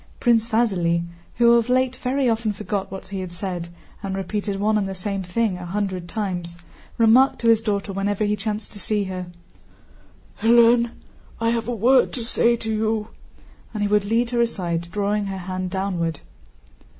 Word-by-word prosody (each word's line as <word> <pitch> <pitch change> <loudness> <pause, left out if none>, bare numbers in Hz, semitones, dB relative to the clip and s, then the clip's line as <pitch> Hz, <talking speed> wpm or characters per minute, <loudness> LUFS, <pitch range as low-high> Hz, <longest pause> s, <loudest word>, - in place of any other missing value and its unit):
Prince 230 -2 +3
Vasíli, 175 -7 +1 0.3
who 235 0 +5
of 235 +1 0
late 255 0 +2
very 265 +1 0
often 225 -2 +1
forgot 200 -1 -3
what 190 -1 -8
he 195 -1 -4
had 185 -2 -5
said 175 -1 -4 0.3
and 195 -1 -3
repeated 195 +1 -3
one 215 +2 +2
and 200 -2 0
the 190 - -5
same 195 +1 -3
thing 190 +1 -1
a 180 - -7
hundred 185 -2 -3
times, 175 -5 -3 0.4
remarked 235 +4 +5
to 230 - +3
his 225 -1 +3
daughter 200 -2 -2
whenever 200 +2 -1
he 210 0 +1
chanced 210 +1 -4
to 205 - -8
see 210 +1 0
her: 185 -2 -5 1.1
"Hélène, 235 +1 +5 0.5
I 230 0 +1
have 230 -1 -1
a 245 - -1
word 250 +4 +4
to 240 -3 -3
say 235 0 +3
to 225 -1 -3
you," 215 0 0 0.7
and 210 - -1
he - - +2
would 210 0 +3
lead 230 +3 +1
her 240 -1 +2
aside, 175 -7 -1
drawing 205 +1 -1
her 195 -1 -4
hand 185 0 -4
downward. 180 -4 -2
210 Hz, 180 wpm, -23 LUFS, 190-230 Hz, 1.1 s, who